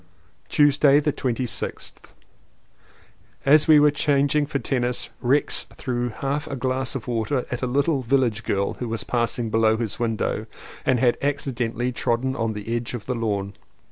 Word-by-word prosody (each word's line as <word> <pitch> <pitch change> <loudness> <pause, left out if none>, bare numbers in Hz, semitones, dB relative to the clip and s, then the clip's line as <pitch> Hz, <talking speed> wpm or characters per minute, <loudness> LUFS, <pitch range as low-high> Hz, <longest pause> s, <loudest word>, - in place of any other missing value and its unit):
Tuesday 145 -1 +5
the 150 -1 0
26th. 125 -2 -4 1.3
As 150 +3 +5
we 155 -2 +8
were 150 0 +5
changing 145 0 +2
for 145 - -1
tennis 125 -1 -2
Rex 135 +4 +2
threw 125 -2 -2
half 140 +5 -3
a 140 - -4
glass 130 +1 -1
of 130 - -5
water 120 +2 -1
at 120 - -3
a 130 - 0
little 140 +3 +1
village 120 -4 +1
girl 100 0 -1
who 120 - -3
was 110 -4 -3
passing 120 0 -1
below 110 0 +3
his 115 -3 -3
window 115 -2 -1 0.4
and 130 -2 +3
had 120 -1 +2
accidentally 125 -4 -1
trodden 125 +2 -1
on 115 -2 -1
the 105 +3 -4
edge 120 +1 -3
of 110 - -7
the 130 - -1
lawn. 100 -4 -2
125 Hz, 160 wpm, -23 LUFS, 115-140 Hz, 1.3 s, we